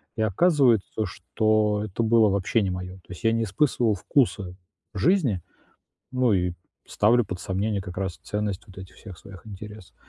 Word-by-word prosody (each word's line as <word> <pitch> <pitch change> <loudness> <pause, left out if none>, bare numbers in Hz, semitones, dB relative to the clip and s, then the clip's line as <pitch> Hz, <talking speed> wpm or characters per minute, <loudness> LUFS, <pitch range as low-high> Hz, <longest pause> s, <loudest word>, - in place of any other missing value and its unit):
и 110 - -2
оказывается, 115 - +2
что 105 +3 0
это 105 +2 -3
было 110 -1 +4
вообще 100 +3 +1
не 100 - 0
моё. 90 0 -5
То 90 - -22
есть 90 - -10
я 115 - +4
не 115 0 +1
испытывал 115 +1 +1
вкуса 100 -4 0 0.4
жизни, 120 - +2 0.7
ну 125 -3 +2
и 90 -2 +1 0.3
ставлю 115 +3 +3
под 95 -2 -6
сомнение, 100 +2 -2
как 90 -2 -9
раз, 95 -5 -3
ценность 105 -2 -3
вот 95 - -16
этих 95 0 -10
всех 95 -6 -11
своих 100 -1 -13
интересов. 105 -1 -10
105 Hz, 165 wpm, -25 LUFS, 95-115 Hz, 0.7 s, было